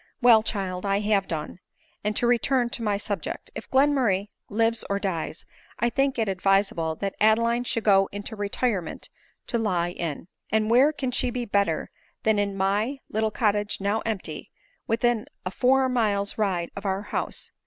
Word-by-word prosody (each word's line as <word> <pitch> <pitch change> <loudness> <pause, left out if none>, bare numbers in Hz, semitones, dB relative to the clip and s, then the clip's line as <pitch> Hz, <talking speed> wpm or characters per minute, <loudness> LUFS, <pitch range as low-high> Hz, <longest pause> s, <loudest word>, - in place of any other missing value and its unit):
" - - -47
Well, 235 -3 +8
child, 190 -4 -3
I 200 0 +1
have 205 -2 +1
done; 160 +2 -5 0.4
and 210 0 -1
to 240 - +1
return 245 +1 +2
to 240 - -3
my 210 -3 +1
sub 205 -3 -3
ject; - - -6
if - - -8
Glenmurray 260 -8 +2 0.2
lives 225 +2 +1
or 200 - +1
dies, 180 -5 -3 0.3
I 235 +1 +1
think 270 +1 +1
it 225 -2 +1
advisable 190 -4 +1
that 195 +3 -3
Adeline 230 +3 +3
should 230 -2 -1
go 195 -2 +4
into 205 +2 -5
retirement 205 -3 -2 0.3
to 235 - -1
lie 180 -6 0
in. 165 -2 -4 0.2
And 215 +1 +2
where 260 +5 +6
can 270 -4 -3
she 250 - 0
be 245 0 -3
better 200 -7 0 0.3
than 220 -1 +3
in 200 -1 -1
my 205 +8 +1
little 220 +1 +1
cottage 210 -2 0
now 200 +2 0
empty, 220 -4 -4 0.4
within 230 0 +1 0.2
a 185 - -2
four 265 +4 +3
miles 210 -5 +1
ride 185 -5 -1
of 200 - -6
our 195 0 -1
house - - -4
210 Hz, 175 wpm, -26 LUFS, 195-235 Hz, 0.4 s, Well